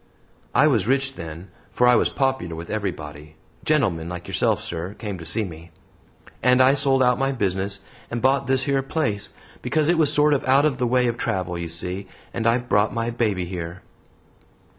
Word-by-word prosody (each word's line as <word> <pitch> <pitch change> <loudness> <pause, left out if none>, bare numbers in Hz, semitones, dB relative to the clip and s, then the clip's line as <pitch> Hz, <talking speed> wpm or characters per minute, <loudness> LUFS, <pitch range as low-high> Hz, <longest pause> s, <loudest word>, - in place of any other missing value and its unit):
I 145 - +6
was 115 -10 +2
rich 135 +1 +1
then, 85 -1 -9 0.2
for 125 - +2
I 125 - +6
was - - +3
popular 130 - -1
with 85 +1 -7
everybody 80 -7 -5 0.3
gentlemen 100 - +1
like 90 0 -7
yourself, - - +1
sir, 90 +4 -5
came 105 -5 -5
to 80 - -7
see 110 -2 +2
me 85 -1 -10 0.7
and 125 0 +4
I 130 +1 +6
sold 135 -2 +3
out 125 -1 +3
my 135 0 +1
business 100 -4 -1 0.3
and 120 - -3
bought 135 +2 +2
this 130 0 +1
yer 140 -1 +1
place, 130 -7 -2 0.3
because 155 0 +1
it 175 -1 +3
was 155 -3 +4
sort 150 0 +4
of 140 - 0
out 135 +3 +5
of 145 -4 +1
the 125 - +1
way 125 +1 +2
of 120 -1 -1
travel, 90 -2 -2
you 85 -1 -4
see, 90 +4 -3 0.3
and 115 - -1
I 115 +1 +4
brought 110 -4 +1
my 115 0 -1
baby 105 -6 0
here." 85 0 -6
115 Hz, 195 wpm, -23 LUFS, 90-135 Hz, 0.7 s, I